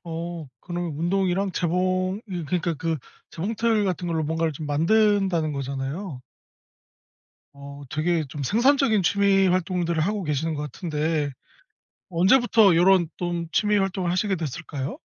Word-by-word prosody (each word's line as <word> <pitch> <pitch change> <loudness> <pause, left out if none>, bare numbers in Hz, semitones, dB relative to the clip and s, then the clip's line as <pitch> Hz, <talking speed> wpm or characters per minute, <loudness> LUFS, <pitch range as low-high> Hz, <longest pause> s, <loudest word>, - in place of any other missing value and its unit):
어. 165 -1 -5
그러면 175 -2 -4
운동이랑 190 +3 0
재봉 185 +3 0
예, 175 -3 -3
그러니까 170 +2 -1
그 165 +2 -2 0.3
재봉틀 220 +4 0
같은 180 -2 -2
걸로 165 -1 0
뭔가를 160 +1 -1
좀 150 +2 -7
만든다는 180 +1 +2
거잖아요. 140 +3 -5 1.3
어 140 0 -10
되게 160 +1 0
좀 145 +1 -6
생산적인 235 - +3
취미 195 +1 +3
활동들을 180 -2 0
하고 200 +2 -1
계시는 150 +2 -1
것 145 - -4
같은데 150 -1 -2 0.8
언제부터 205 +2 +4
요런 180 -1 +4
좀 175 -1 -3
취미 210 -1 +2
활동을 190 -2 -1
하시게 190 +2 0
됐을까요? 155 - -5
175 Hz, 305 characters per minute, -24 LUFS, 160-195 Hz, 1.3 s, 언제부터